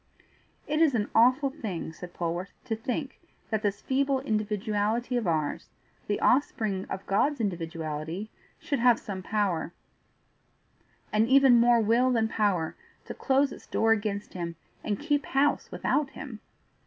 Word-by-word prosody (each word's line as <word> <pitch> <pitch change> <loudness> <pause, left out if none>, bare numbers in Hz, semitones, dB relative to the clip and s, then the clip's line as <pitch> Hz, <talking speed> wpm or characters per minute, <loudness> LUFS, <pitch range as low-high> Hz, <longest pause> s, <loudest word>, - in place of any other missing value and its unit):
"It 305 +2 0
is 305 -6 +4
an 210 -2 -1
awful 255 +4 +4
thing," 200 - -5
said 180 +1 -9
Polwarth, 175 +2 -3
"to 225 - -1
think 255 +5 -4 0.3
that 220 -1 0
this 205 -2 -2
feeble 275 +1 +1
individuality 215 +1 -1
of 235 -5 0
ours, 155 -3 -1 0.4
the 205 - 0
offspring 215 -7 +1
of 190 - -5
God's 275 +8 +1
individuality, 165 -1 -4 0.3
should 280 - -2
have 240 -1 +5
some 190 -2 -6
power, 185 -5 -1 1.4
and 215 +1 +3
even 265 -1 +6
more 235 0 +5
will 235 +4 +3
than 230 -3 +2
power, 200 -7 0 0.3
to - - -6
close 275 +1 +2
its - - -11
door 225 0 +2
against 205 -2 -1
him, 170 -2 -4 0.3
and 205 -2 -1
keep 290 -1 0
house 285 +2 +1
without 290 -2 0
him!" 260 -8 -8
220 Hz, 145 wpm, -28 LUFS, 195-260 Hz, 1.4 s, even